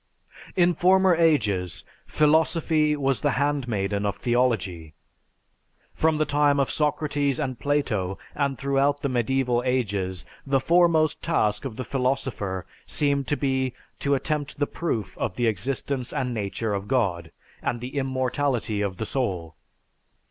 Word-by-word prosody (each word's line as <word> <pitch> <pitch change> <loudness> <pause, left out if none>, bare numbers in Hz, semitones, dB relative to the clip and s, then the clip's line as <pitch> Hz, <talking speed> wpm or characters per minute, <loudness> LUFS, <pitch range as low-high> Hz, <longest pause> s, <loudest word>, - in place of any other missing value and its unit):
In 175 -1 +4
former 185 +2 +4
ages, 105 - +1 0.2
philosophy 155 0 +3
was 135 -3 0
the 145 -2 +2
handmaiden 120 -9 0
of 100 -1 0
theology. 110 -10 0 1.0
From 160 -1 +2
the 155 - +2
time 145 -1 +3
of 135 - +1
Socrates 150 -2 0
and 130 -2 -3
Plato, 110 -10 0 0.2
and 140 -2 -1
throughout 140 +2 +1
the 140 - +1
medieval 125 0 +1
ages, 100 -8 -1 0.2
the 135 -1 +2
foremost 165 0 +3
task 105 -9 0
of 125 -5 -5
the 130 - -4
philosopher 125 -9 -2 0.2
seemed 140 -2 0
to 145 - 0
be 130 -2 0 0.2
to 140 0 +2
attempt 150 +1 -2
the 145 - +1
proof 130 - -3
of 90 - -2
the 120 - 0
existence 125 +4 -2
and 125 -2 -2
nature 105 0 -2
of 100 0 -3
God, 95 -10 0 0.3
and 120 - -2
the 125 +4 -7
immortality 130 -4 0
of 100 -3 -2
the 110 - -3
soul. 95 - -2
130 Hz, 140 wpm, -25 LUFS, 110-145 Hz, 1.0 s, In